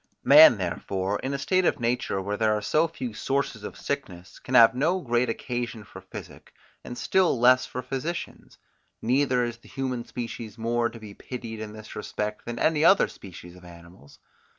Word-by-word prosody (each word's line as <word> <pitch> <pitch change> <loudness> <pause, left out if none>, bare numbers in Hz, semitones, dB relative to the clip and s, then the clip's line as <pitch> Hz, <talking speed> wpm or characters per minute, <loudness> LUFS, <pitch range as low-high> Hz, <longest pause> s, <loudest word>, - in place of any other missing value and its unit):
Man 145 -4 +8
therefore, 95 +2 -2
in 135 - -3
a 140 - -2
state 185 +7 +1
of - - +1
nature 120 -4 -1
where 100 +2 -3
there 110 0 +2
are 105 - -2
so 160 +2 +2
few 130 -7 -6
sources 135 -2 -2
of - - -7
sickness, 95 -11 -6
can 130 - -4
have 115 -2 +8
no 160 +9 +1
great 120 -5 0
occasion 120 -1 -4
for - - -12
physic, - - -11 0.3
and 120 - -8
still 185 -9 +2
less 125 +1 +5
for 125 - -6
physicians; 135 +7 -5 0.4
neither 125 +1 +1
is 120 -1 -4
the 115 - -20
human 130 -3 -3
species 115 -3 -7
more 115 +1 0
to 115 - -11
be 105 -2 -10
pitied 115 -1 -8
in 110 -1 -7
this 110 0 -11
respect, 105 0 -4
than 120 0 -5
any 155 +4 +2
other 195 +4 +6
species 90 -2 -12
of 90 - -16
animals. 85 -3 -15
120 Hz, 185 wpm, -26 LUFS, 105-135 Hz, 0.4 s, Man